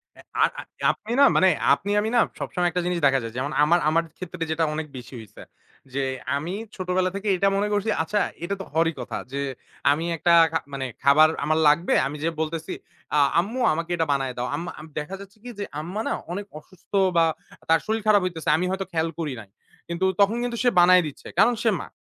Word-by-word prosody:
এ্যা - - -16 0.2
আর - - +4
আ - - -6 0.3
আপনি 220 - -9
না 280 - +8
মানে 190 - +5 0.2
আপনি 200 - -2
আমি 215 +1 -1
না - - +5 0.2
সবসময় 175 -1 -1
একটা 180 - -1
জিনিস 180 -1 0
দেখা 135 -1 +4
যায় 115 0 -6
যেমন, 140 +3 -2
আমার 170 +3 +4
আমার 165 +1 +2
ক্ষেত্রে 185 -2 -5
যেটা 160 +1 0
অনেক 155 0 -4
বেশি 125 +1 -10
হইছে 110 -3 -13 0.5
যে, 140 - -1 0.4
আমি 165 +6 -4 0.2
ছোটবেলা 185 0 0
থেকে 200 +1 -4
এইটা 195 +2 +2
মনে 205 +1 +1
করছি, 205 +2 0
আচ্ছা 205 +6 -1 0.2
এটা 200 +3 -2
তো - - -7
হওয়ারই 165 +1 +2
কথা - - -5
যে, 140 - -3 0.5
আমি 160 +3 0
একটা 170 +2 +3 0.2
খা 160 - +1
মানে 135 -1 -3 0.2
খাবার 155 +3 +6 0.2
আমার 155 +1 +2
লাগবে 160 +4 +3
আমি 145 - -6
যেয়ে 165 0 -1
বলতেছি, 160 0 -3 0.4
"আ - - +5 0.2
আম্মু 225 +8 -2
আমাকে 165 +2 -4
এটা 165 -1 0
বানাইয়া 135 -2 -1
দাও।" 125 +1 -2
আম্মা 170 +4 -5
আম 155 - -9
দেখা 170 +6 -5
যাচ্ছে 200 +2 -14
কি 245 - -8
যে, 205 - -2 0.2
আম্মা 185 +7 -4
না - - 0 0.2
অনেক 200 +3 -4
অসুস্থ 185 +3 -23 0.3
বা 165 - +6 0.4
তার 165 0 +5
শরীর 220 0 -1
খারাপ 205 -2 +5
হইতেছে 165 -3 -3
আমি 180 - -1
হয়তো 190 0 -2
খেয়াল 165 0 0
করি 150 -5 -2
নাই। 100 - -16 0.4
কিন্তু 170 +2 -1 0.2
তখন 210 +4 +3
কিন্তু 240 -1 -3
সে 245 - +5
বানায় 180 0 +6
দিচ্ছে 145 - -10
কারণ 240 +3 +5
সে 225 - +4
মা। - - -8
170 Hz, 220 wpm, -24 LUFS, 155-195 Hz, 0.5 s, না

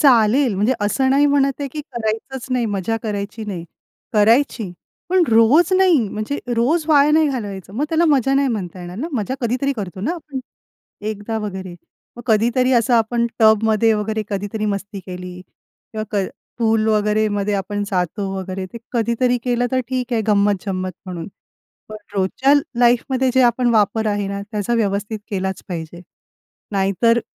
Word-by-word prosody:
चालेल, 245 -2 +4
म्हणजे 210 +7 +2
असं 260 +6 +1
नाही 285 +2 +4
म्हणत 280 -1 +3
आहे, 280 - -2
की 305 - -4
करायचंच 235 +3 -3
नाही, 250 -2 +1
मजा 205 +1 -1
करायची 210 0 -4
नाही. 185 -5 -5 0.5
करायची, 220 -2 +3 0.4
पण 370 0 +4
रोज 245 +11 +5
नाही, 370 -5 +5
म्हणजे 215 +8 -3 0.2
रोज 290 +8 +2
वाया 295 -1 +5
नाही 310 0 +4
घालवायचं 200 -8 -5
मग 280 - 0
त्याला 330 +1 +2
मजा 270 -2 +3
नाही 275 0 +3
म्हणता 190 -6 -4
येणार 175 +1 -8
ना? 265 +9 -3
मजा 250 +1 -2
कधीतरी 255 +3 0
करतो 190 -3 -5
ना 275 - -1
आपण, 295 -5 -7 0.6
एकदा 215 +1 -3
वगैरे. 190 -4 -6 0.4
मग 240 - -8
कधीतरी 240 +3 +3
असं 235 +1 +3
आपण 235 +1 +2
टब 220 -1 +5
मध्ये 220 0 +3
वगैरे 215 +1 -1
कधीतरी 205 +1 -3
मस्ती 200 0 -3
केली 180 -1 -8
किंवा 215 +4 -10
क 195 -3 0 0.3
पूल 220 -1 +2
वगैरे 215 0 +2
मध्ये 205 0 -1
आपण 205 +1 -2
जातो 185 +1 -1
वगैरे, 190 0 -4
ते 210 +5 -9
कधीतरी 240 +1 +1
केलं 245 -1 +1
तर 260 - +2
ठीक 255 -1 -2
आहे 225 - +2
गंमत-जंमत 200 -2 +1
म्हणून. 175 -3 -6 0.6
पण 215 - -7 0.2
रोजच्या 200 +8 +2 0.3
लाईफमध्ये 250 +2 +3
जे 260 - +4
आपण 245 0 +3
वापर 220 +1 +2
आहे 205 -1 -1
ना 200 0 -4
त्याचा 210 +2 -1
व्यवस्थित 210 0 -1
केलाच 190 -1 -2
पाहिजे. 170 -1 -6 0.7
नाहीतर 200 +4 +2
220 Hz, 160 wpm, -20 LUFS, 200-250 Hz, 0.7 s, रोज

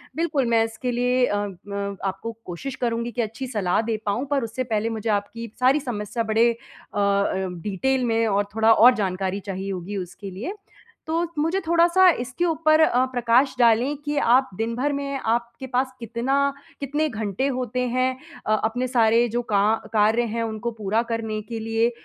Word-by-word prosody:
बिल्कुल, 310 -5 0
मैं 230 -1 +3
इसके 225 +3 -4
लिए 250 +1 +2
अ 205 - -1
अ, 200 0 -4
आपको 195 +4 -4
कोशिश 255 +10 -6
करूँगी 235 -1 -2
की 235 - -2
अच्छी 225 +5 -7
सलाह 210 -5 0
दे 225 -1 -2
पाऊँ, 205 +6 -1
पर 275 -4 +1
उससे 230 +3 -3
पहले 225 -1 -1
मुझे 225 0 -3
आपकी 210 +3 -2
सारी 265 +4 +4
समस्या 230 -3 -3
बड़े 225 +2 +3 0.4
अ - - -2
अ, 200 0 +2 0.3
डीटेल 250 +8 0
में 230 -1 +1
और 205 -1 +2
थोड़ा 220 0 +4
और 235 +3 +7
जानकारी 190 -1 -2
चाहिए 195 0 -4
होगी 190 +2 -5
उसके 185 +2 -7
लिए। 235 - -5 0.5
तो 335 +2 0
मुझे 330 +6 +1
थोड़ा-सा 340 +2 +5
इसके 260 +8 -2
ऊपर 315 -1 +3
अ, 255 -4 +4
प्रकाश 245 +2 +2
डालें 240 +5 +4
कि 295 0 -1
आप 260 -1 +4
दिन 230 +1 -2
भर 285 +4 0
में 280 -1 -3
आपके 235 +3 -1
पास 260 +1 0
कितना 265 +5 0 0.3
कितने 295 +3 0
घंटे 220 +3 -2
होते 250 -2 -2
हैं 255 +1 +1 0.4
अ, 215 - +2
अपने 245 +3 0
सारे 235 -1 +3
जो 240 - +2
का 200 - +4 0.3
कार्य 220 +2 +3
हैं 230 - 0
उनको 225 +1 -3
पूरा 220 0 0
करने 220 -2 -2
के 230 -1 -4
लिए? 225 +1 +1
230 Hz, 180 wpm, -24 LUFS, 215-260 Hz, 0.5 s, और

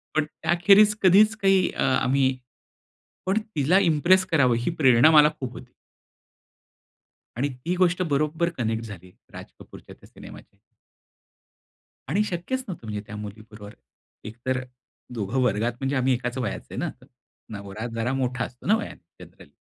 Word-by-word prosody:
पण 155 -1 +2
त्याखेरीज 175 +7 +3
कधीच 210 +4 +5
काही 195 -3 +3
अ, - - -5
आम्ही 130 0 +1 0.9
पण 190 +3 +1 0.2
तिला 155 +6 +3
इम्प्रेस 180 +5 +3
करावं 140 -9 +2
ही 120 - -2
प्रेरणा 130 +2 +6
मला 150 -1 +7
खूप 125 -2 -5
होती. 125 -1 -12 1.6
आणि 140 +4 -1 0.2
ती 175 +2 0
गोष्ट 180 0 +1
बरोबर 155 +4 0
कनेक्ट 115 -1 -2
झाली 90 -4 -11 0.2
राज - - -9
कपूरच्या - - -14
त्या - - -19
सिनेमाशी. - - -14 1.5
आणि 200 +8 +1
शक्यच 205 +8 -4
नव्हतं 165 - -8
म्हणजे 105 -1 -4
त्या 105 - -8
मुलीबरोबर, 105 0 -10 0.5
एक 110 +2 -9
तर 130 0 0
अ, - - -9 0.5
दोघं 115 +2 -2
वर्गात 115 0 0
म्हणजे 135 +1 -2
आम्ही 130 0 +2
एकाच 125 +1 -3
वयाचे 110 -6 -5
आहे - - -7
ना, - - -2 0.7
नवरा 100 +4 -7
जरा 115 +3 -1
मोठा 125 -2 -2
असतो 125 0 -14
ना 210 - +5
वयाने - - -10
जनरली. - - -19
135 Hz, 150 wpm, -24 LUFS, 115-175 Hz, 1.6 s, मला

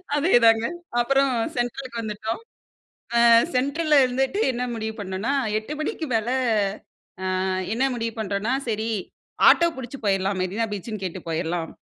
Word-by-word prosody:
அதேதாங்க. 230 -8 +4 0.3
அப்பறம் 275 +1 +2 0.2
சென்ட்ரலுக்கு 245 0 -3
வந்துட்டோம். 220 - -4 0.8
அ - - +6 0.3
சென்ட்ரல்ல 290 +4 +2
இருந்துட்டு 265 - 0
என்ன 250 +1 -2
முடிவு 220 -1 -4
பண்ணோம்ன்னா, 195 +6 -2 0.3
8 250 +8 -6
மணிக்கு 315 +1 -3
மேல 225 +2 0 1.1
அ - - -1 0.3
என்ன 260 - +1
முடிவு 230 -1 -3
பண்றோம்ன்னா, 205 +4 -1 0.2
"சரி 220 +1 -1 0.6
ஆட்டோ 340 - +5
புடிச்சு 260 +2 -7
போயிரலாம். 195 -1 +1
மெரினா 205 +5 -1
பீச்சுன்னு 205 0 -5
கேட்டு 180 0 -5
போயரலாம்." 165 +1 -2
230 Hz, 125 wpm, -24 LUFS, 205-265 Hz, 1.1 s, அ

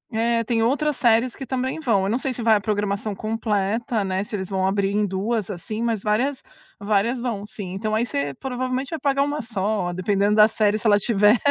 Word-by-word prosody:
é, 230 +1 +1
tem 225 0 0
outras 290 +4 +1
séries 235 +1 +3
que 270 - -7
também 260 +3 -2
vão. 225 -10 +1
Eu - - -1
não 235 - +1
sei 260 -1 -2
se 240 - -5
vai 225 -1 +5
a 205 - +1
programação 205 0 -2
completa, 215 0 -1
né, 190 +1 -1
se 210 - -6
eles 190 -2 -4
vão 190 -1 0
abrir 195 0 +1
em 210 0 +1
2 205 +3 -2
assim, 215 +4 -5
mas 225 -4 -1
várias 250 +6 0 0.4
várias 210 +4 +1
vão, 215 -5 -3
sim. 190 -4 -7
Então 215 +2 -2
aí 235 +2 +1
você 140 -8 -2
provavelmente 255 +1 -3
vai 320 - -3
pagar 275 0 +2
uma 290 +1 -2
só, 205 -4 -1
dependendo 200 +3 +1
da 210 0 +7
série, 215 -1 +1
se - - -13
ela 205 -1 +5
tiver, 210 +2 +4
215 Hz, 220 wpm, -23 LUFS, 200-240 Hz, 0.4 s, da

